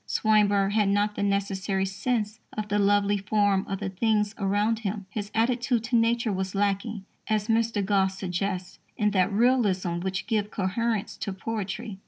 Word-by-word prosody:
Swinburne 205 -2 +3
had 210 -1 +2
not 205 +1 +1
the - - -4
necessary 200 -1 0
sense 215 +2 -2
of 215 -1 -4
the 205 0 +1
lovely 205 0 +3
form 200 -1 +2
of 195 - -3
the 205 - -3
things 210 +1 +1
around 205 +3 +1
him. 205 -2 -4
His 205 -2 -4
attitude 240 +1 +1
to 240 +1 -1
Nature 230 -1 +2
was 190 +1 -3
lacking, 200 +1 -1 0.2
as 215 -1 0
Mr. 225 -2 +1
Gosse 190 -1 +1
suggests, 185 0 -3 0.2
in 210 0 +2
that 190 0 +2
realism 200 -6 +2
which 190 +1 -3
gives 210 -1 0
coherence 215 +2 -1
to 200 - -4
poetry. 200 0 -5
205 Hz, 165 wpm, -26 LUFS, 195-220 Hz, 0.2 s, Swinburne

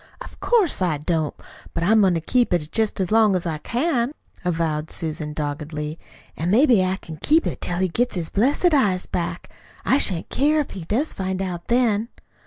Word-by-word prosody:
"Of - - -11
course 425 - +2
I 175 -5 +1
don't. 155 0 -1 0.4
But 170 - -1
I'm 215 +4 +5
going 185 -3 +4
to 165 - -1
keep 240 +2 +2
it 155 -2 -3
jest 220 -2 0
as 185 0 -1
long 215 -3 +4
as 180 - -2
I 160 -3 -2
can," 250 - 0 0.3
avowed 160 -3 -1
Susan 155 -2 -4
doggedly. 150 +1 -4 0.4
"An' 165 +3 -2
maybe 235 -1 +5
I 185 +1 0
can 160 -5 -10
keep 310 - +3
it - - -4
till 175 - -2
he 185 +1 +2
gets 240 +8 -1
his 170 -3 -3
blessed 285 - +2
eyes 200 -10 +2
back. 170 -1 -4 0.3
I 270 - +4
shan't 180 -10 0
care 300 +3 +2
if 295 - -2
he 180 -4 -7
does 255 - -1
find 190 -1 -3
out 180 -3 -4
then." 235 -2 +2
185 Hz, 195 wpm, -22 LUFS, 165-240 Hz, 0.4 s, I'm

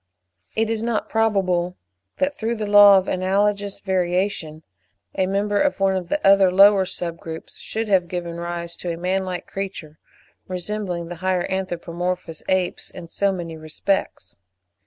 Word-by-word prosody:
It 225 0 +1
is 225 -1 -1
not 230 -2 -1
probable 185 -5 +1 0.4
that, 280 +1 0
through 230 +1 -2
the 215 -1 -3
law 205 -1 +8
of 190 - 0
analogous 200 +2 0
variation, 180 -3 -1 0.5
a 185 - 0
member 205 +1 +1
of 290 -6 +1
one 195 0 +2
of 180 -2 -3
the 300 - +1
other 195 -1 +6
lower 195 0 +6
sub 170 -2 -4
groups 160 -1 -8
should 225 0 -3
have 190 -4 +3
given 170 -1 -4
rise 170 0 -4
to 175 - -4
a 165 - -4
man 185 +2 -1
like 180 -1 -4
creature, 185 -6 -6 0.5
resembling 180 -1 -3
the 175 - -6
higher 185 -1 +1
anthropomorphous 180 -2 -3
apes 185 -1 0
in 170 -3 -10
so 200 +3 +1
many 170 -3 -5
respects. 155 - -3
185 Hz, 155 wpm, -22 LUFS, 175-200 Hz, 0.5 s, law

